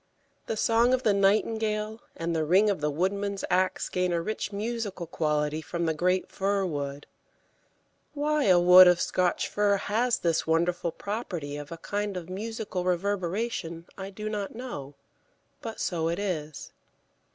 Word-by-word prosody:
The 225 - -2
song 235 +4 +4
of 260 - -5
the 210 - +4
nightingale 215 +2 +1
and 165 0 -2
the 160 - +1
ring 190 +7 +4
of 185 - -3
the 150 - +1
woodman's 195 +5 -1
axe 185 +1 +1
gain 180 0 0
a 170 - +1
rich 205 +2 -3
musical 210 -3 -3
quality 150 -1 -1
from 170 +1 -3
the 160 - +1
great 180 +4 +1
fir 195 0 0
wood. 145 -3 -4 1.1
Why 300 0 +1
a 180 -2 +6
wood 180 +1 +9
of 180 0 +5
Scotch 180 -1 +1
fir 205 -1 +2
has 230 +5 +1
this 165 -2 0
wonderful 170 +1 +1
property 175 -7 -5
of 145 +1 -8
a 165 - -5
kind 205 +2 -3
of 180 0 -7
musical 210 -2 -4
reverberation 185 -1 -2
I 195 0 -6
do 210 +2 -6
not 210 -1 -4
know; 145 - -7 0.7
but 225 -1 -6
so 165 -2 -1
it 170 - -1
is. 155 -7 -4
185 Hz, 160 wpm, -27 LUFS, 170-210 Hz, 1.1 s, wood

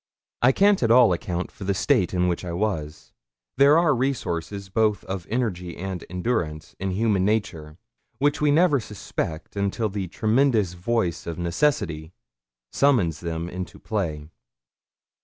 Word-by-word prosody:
I 125 - +6
can't 200 +6 +3
at 115 - +2
all 115 -4 +6
account 90 +1 -3
for - - -10
the 100 0 0
state 110 -4 +2
in 90 -1 +1
which 90 0 -1
I 85 -2 -4
was. 85 -6 -3 0.4
There 140 +3 +6
are 165 -3 +4
resources 100 -7 -2
both 105 +1 +1
of 95 -3 -5
energy 95 -8 -2
and 95 -1 -5
endurance 90 -5 -3
in 95 - -2
human 100 0 +1
nature 85 -7 -2 0.4
which 145 +4 +1
we 150 - +3
never 150 -1 +4
suspect 95 -7 -5
until 100 +2 -1
the 95 -2 -4
tremendous 110 0 +1
voice 90 -2 -1
of 85 - -4
necessity 85 - -1 0.6
summons 105 - +2
them 85 0 -4
into 90 0 -6
play. 80 -8 -4
95 Hz, 145 wpm, -24 LUFS, 85-120 Hz, 0.6 s, I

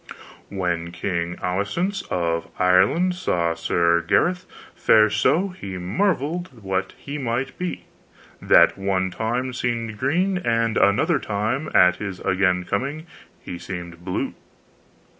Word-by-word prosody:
When 85 -3 -2
King 85 0 -2
Aswisance 105 - -1
of 85 -2 -1
Ireland 95 - +3
saw 85 - 0
Sir 85 +1 +2
Gareth 180 - +1 0.3
fare 110 -1 +4
so 185 - +2
he 100 - -7
marvelled 155 - -1
what 95 -1 -2
he 145 +1 -6
might 130 +1 -2
be, 180 -1 -4 0.6
that - - +5
one 95 -1 0
time 120 +6 -2
seemed 115 -3 -3
green, 180 +8 +1
and 115 -7 0
another 100 +1 +3
time, 110 +8 -2
at 90 0 +6
his 100 -2 -5
again 95 -1 +1
coming, 140 - -3 0.4
he 90 - -7
seemed 85 -2 -7
blue. 90 0 -2
100 Hz, 120 wpm, -23 LUFS, 90-140 Hz, 0.6 s, at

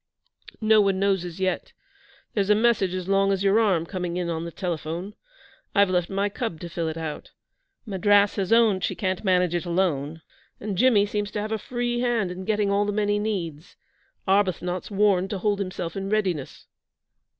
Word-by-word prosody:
'No 220 -1 +5
one 195 -1 +2
knows 195 -2 +1
as 175 0 -7
yet. 185 -1 -2 0.6
There's 200 -2 0
a 210 - +6
message 215 -5 +2
as 185 -1 -4
long 195 0 +3
as 195 0 0
your 200 +2 +4
arm 190 -7 +2
coming 180 -1 -4
in 175 -1 -2
on 165 0 -3
the 170 - -6
telephone. 170 +2 -4 0.6
I've 200 -2 +4
left 180 -2 0
my 195 +1 0
cub 205 -5 -4
to 175 - -6
fill 165 -1 -3
it 160 0 -4
out. 160 -2 -6 0.6
Madras 205 0 +3
has 195 0 -1
owned 220 -5 +4
she - - -1
can't 185 0 -2
manage 180 -3 +2
it 175 - -1
alone, 165 -4 -1 0.4
and 205 -1 -4
Jimmy 215 -1 +4
seems 205 0 -2
to 210 - -4
have 215 +1 -4
a 220 - -1
free 240 +1 -2
hand 235 -6 0
in 185 +1 -7
getting 210 -1 +1
all 200 +1 +2
the - - 0
men 205 0 0
he 205 0 +2
needs. 180 -6 -4 0.5
Arbuthnot's 185 -2 0
warned 195 -2 +2
to 200 - -3
hold 205 +2 0
himself 185 -4 -4
in 195 0 -4
readiness.' 190 -9 -2
195 Hz, 195 wpm, -25 LUFS, 180-205 Hz, 0.6 s, a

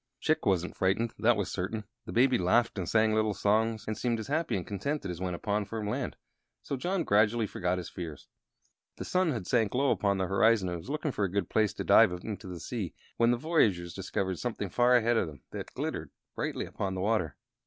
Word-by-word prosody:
Chick 155 0 +1
wasn't 90 -2 +1
frightened, 100 +5 +1
that 115 0 +4
was 100 - -2
certain. 105 +4 -3 0.2
The - - -5
Baby 125 0 +4
laughed 110 +4 +2
and 90 - -3
sang 110 -1 +3
little 110 -1 +1
songs, 110 +3 +1
and 110 - -2
seemed 120 +1 0
as 110 - -6
happy 155 -5 0
and 90 - -4
contented 100 +1 -3
as 85 0 -7
when 90 -1 -2
upon 105 +3 -1
firm 105 +1 -5
land; 105 - -2 0.5
so - - -3
John 175 +6 -1
gradually 105 +1 +3
forgot 90 -2 -1
his 90 - -5
fears. 80 -5 -7 0.7
The - - -5
sun 185 -3 +2
had 115 -9 -3
sank 115 0 +1
low 135 +2 +3
upon 100 -1 +1
the 95 - 0
horizon, 95 +1 +3
and 85 -1 -3
was 80 - -11
looking 150 0 -1
for 105 - 0
a 95 - -3
good 100 -3 -1
place 110 -2 +2
to - - -3
dive 110 -4 +6
into 100 +3 -6
the 90 -2 -6
sea, 105 -7 -4 0.2
when 115 0 +4
the 120 - +3
voyagers 105 - +1
discovered 95 -1 -2
something 110 -5 -3
far 125 +4 +4
ahead 120 -1 +3
of 95 - +1
them 75 -4 -11
that - - -6
glittered - - -3 0.2
brightly - - -3
upon 95 -1 -3
the 95 - -3
water. 95 -8 0
105 Hz, 220 wpm, -30 LUFS, 95-120 Hz, 0.7 s, dive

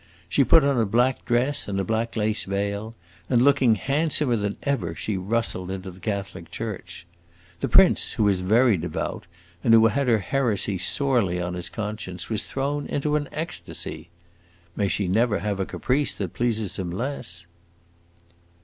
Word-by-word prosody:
She 135 +11 +3
put 155 +4 +6
on 140 -3 +2
a 115 - +3
black 125 +5 +1
dress 130 +4 0
and 100 -1 -2
a - - 0
black 115 +3 -2
lace 110 -1 0
veil, 100 +3 -3 0.3
and 125 - +3
looking 130 -3 +4
handsomer 140 - +1
than 100 -2 -2
ever 100 - -1
she 105 - -3
rustled 95 -1 -1
into 95 0 -5
the 90 - -15
Catholic 100 -5 -4
church. 90 -4 -6 0.5
The - - -2
prince, - - +5
who 105 - +2
is 95 -2 +2
very 110 +3 +4
devout, 85 - -4 0.4
and 115 - +6
who 115 0 +6
had 135 +4 +1
her 115 -2 +4
heresy 105 -3 0
sorely 120 -8 +2
on 90 0 -3
his 90 -1 -4
conscience, 105 -4 -5
was 110 0 -2
thrown 140 +2 -2
into 150 +1 -1
an 145 -1 -1
ecstasy. 85 - -5 0.7
May 100 - 0
she 100 0 0
never 110 +3 +2
have 100 -1 -3
a 95 - -1
caprice 140 +3 0
that 95 -5 -4
pleases 110 -6 -1
him 90 -2 -3
less!" 90 -5 -4
110 Hz, 165 wpm, -24 LUFS, 95-125 Hz, 0.7 s, put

